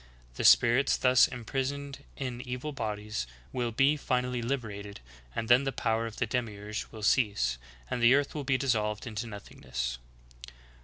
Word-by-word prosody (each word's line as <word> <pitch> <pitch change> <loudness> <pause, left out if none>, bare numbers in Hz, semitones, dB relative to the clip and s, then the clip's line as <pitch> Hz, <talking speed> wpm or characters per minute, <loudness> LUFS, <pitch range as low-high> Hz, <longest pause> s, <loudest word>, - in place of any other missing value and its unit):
The - - -4
spirits 125 +4 +5
thus 125 0 +5
impris 130 +2 -2
oned 140 -1 -7 0.2
in 125 -3 -4
evil 125 +3 -4
bodies 105 - -3 0.3
will 125 -2 -1
be 135 +6 +3
finally 125 -2 -1
liberated, 110 -5 -4 0.4
and 115 - -2
then 120 +3 +6
the 135 - -1
power 115 -2 0
of 110 - -8
the 120 - 0
Demiurge 110 -3 -3
will 110 -2 -9
cease, 80 - +2 0.3
and 120 - -3
the 120 +3 +7
earth 145 0 +1
will 150 - -4
be 130 -1 +2
dissolved 110 -5 0
into 115 0 -4
nothingness. 60 - -5
120 Hz, 160 wpm, -30 LUFS, 105-130 Hz, 0.4 s, the